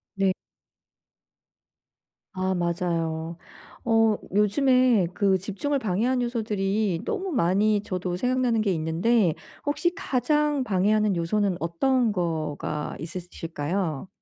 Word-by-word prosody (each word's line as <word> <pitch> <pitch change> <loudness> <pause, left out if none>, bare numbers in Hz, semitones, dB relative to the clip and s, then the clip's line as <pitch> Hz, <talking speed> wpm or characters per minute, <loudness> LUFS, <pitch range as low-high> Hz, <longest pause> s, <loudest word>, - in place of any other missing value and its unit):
네. 195 -1 +2 2.0
아 190 -1 -1
맞아요. 170 -2 -2 0.5
어 225 -2 +4 0.2
요즘에 240 0 +4
그 195 0 +2
집중을 205 +10 -2
방해하는 245 +3 0
요소들이 210 -5 -1
너무 390 -4 -2
많이 205 - +2
저도 185 -2 -3
생각나는 250 -1 +1
게 205 -2 +1
있는데 170 +4 +2 0.3
혹시 345 +4 0
가장 295 - +1
방해하는 210 -1 +2
요소는 185 +2 0
어떤 230 +9 +1
거가 155 -5 -3
있으실까요? 165 0 -4
200 Hz, 230 characters per minute, -25 LUFS, 175-240 Hz, 2.0 s, 어